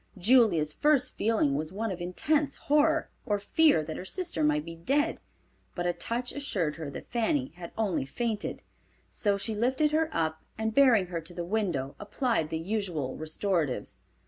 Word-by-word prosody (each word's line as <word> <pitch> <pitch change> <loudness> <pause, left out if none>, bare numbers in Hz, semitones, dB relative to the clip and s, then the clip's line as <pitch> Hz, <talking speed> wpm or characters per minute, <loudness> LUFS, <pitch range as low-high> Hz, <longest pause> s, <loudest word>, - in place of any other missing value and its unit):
Julia's 190 - +4
first 295 - +2
feeling 215 -10 +2
was 155 +3 -2
one 215 +2 -2
of 180 -1 -5
intense 280 - 0
horror, 305 +2 +2
or 205 - 0
fear 205 - +3
her 160 +3 -5
sister 190 - -2
might 150 0 +2
be 165 - -7
dead, 285 - 0 0.6
but 175 - -2
a 175 - +1
touch 240 +6 -3
assured 190 - -1
her 160 -3 -5
that - - -9
Fanny 260 +4 +1
had 170 -1 -8
only 195 -11 0
fainted. 225 - -3 0.5
So 205 -2 0
she 220 +3 -2
lifted 260 +7 +1
her 315 +1 +2
up, 160 - -1 0.2
and 220 0 -1
bearing 245 -8 +5
her 165 - -1
to 170 +2 -6
the 175 - -3
window 175 -9 -1
applied 210 - -1
the 160 - -2
usual 170 -7 -2
restoratives. 155 -2 -2
205 Hz, 170 wpm, -29 LUFS, 165-255 Hz, 0.6 s, bearing